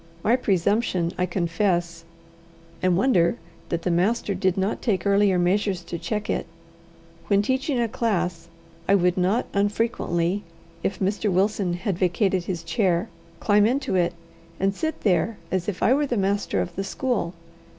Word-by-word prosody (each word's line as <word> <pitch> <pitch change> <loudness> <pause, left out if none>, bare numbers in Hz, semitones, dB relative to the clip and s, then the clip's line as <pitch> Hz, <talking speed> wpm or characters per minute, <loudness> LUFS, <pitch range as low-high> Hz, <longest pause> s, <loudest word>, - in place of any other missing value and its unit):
My 230 - +4
presumption 190 -5 +1
I 180 - 0
confess, 170 -1 -1 0.8
and 180 -1 +2
wonder 195 -4 +3 0.3
that 170 -1 -2
the 180 - +1
master 200 +5 +1
did 185 -1 0
not 195 +2 -1
take 195 -7 0
earlier 200 -1 +4
measures 185 +1 +1
to 170 0 -6
check 210 +5 -3
it. - - -2 0.8
When 200 0 +3
teaching 260 +3 0
a 235 - +2
class, 180 -7 -1 0.4
I 200 - +6
would 180 -2 +2
not 190 +6 +1
unfrequently, 200 -3 0 0.4
if 195 - -1
Mr. 200 +2 0
Wilson 190 0 +1
had 185 -1 -3
vacated 185 0 +1
his 175 -3 -3
chair, 180 +1 0 0.3
climb 210 0 +4
into 265 +1 -1
it, 175 -2 +2 0.5
and 195 +1 +1
sit 315 +9 -3
there 205 +2 +1
as 185 +1 0
if 190 - -4
I 250 - +5
were 290 +1 +1
the 245 - -1
master 200 +1 0
of 175 - -5
the 195 - -2
school. 195 -4 -2
195 Hz, 160 wpm, -24 LUFS, 175-210 Hz, 0.8 s, I